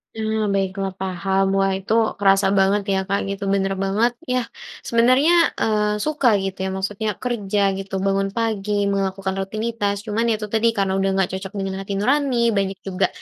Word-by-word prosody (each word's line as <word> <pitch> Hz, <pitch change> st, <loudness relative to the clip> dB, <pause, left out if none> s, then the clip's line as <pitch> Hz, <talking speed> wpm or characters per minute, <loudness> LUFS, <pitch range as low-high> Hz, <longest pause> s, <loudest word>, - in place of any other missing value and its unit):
Ah, 220 Hz, 0 st, -1 dB
baiklah, 195 Hz, 0 st, -1 dB
paham. 190 Hz, +1 st, 0 dB
Wah 195 Hz, 0 st, +2 dB
itu 195 Hz, +3 st, -2 dB, 0.3 s
kerasa 195 Hz, -1 st, +4 dB
banget 195 Hz, +2 st, +3 dB
ya -, -, +2 dB
Kak 200 Hz, +1 st, 0 dB
gitu, 200 Hz, 0 st, -5 dB
bener 195 Hz, 0 st, +1 dB
banget 215 Hz, +5 st, +2 dB, 0.2 s
yah. 250 Hz, -1 st, +1 dB, 0.4 s
Sebenarnya, 255 Hz, +7 st, +4 dB, 0.3 s
eee, 210 Hz, -1 st, +1 dB
suka 305 Hz, -4 st, +1 dB, 0.2 s
gitu 195 Hz, 0 st, -4 dB
ya -, -, -1 dB
maksudnya 200 Hz, +3 st, -3 dB, 0.2 s
kerja 210 Hz, -5 st, -1 dB, 0.2 s
gitu 195 Hz, 0 st, -8 dB
bangun 195 Hz, 0 st, +1 dB
pagi, 215 Hz, -3 st, -1 dB, 0.2 s
melakukan 195 Hz, 0 st, -2 dB
rutinitas 215 Hz, +1 st, -2 dB
cuman 215 Hz, +2 st, -1 dB
ya 225 Hz, -, +3 dB
itu 210 Hz, -, -5 dB
tadi 220 Hz, +1 st, +3 dB
karena 195 Hz, -1 st, +1 dB
udah 195 Hz, 0 st, +1 dB
nggak 190 Hz, -2 st, +1 dB
cocok 190 Hz, 0 st, -5 dB
dengan 195 Hz, 0 st, -3 dB
hati 195 Hz, +1 st, -5 dB
nurani, 275 Hz, +3 st, +1 dB, 0.2 s
banyak 195 Hz, -1 st, -1 dB
juga 190 Hz, 0 st, +1 dB
200 Hz, 175 wpm, -21 LUFS, 195-220 Hz, 0.4 s, kerasa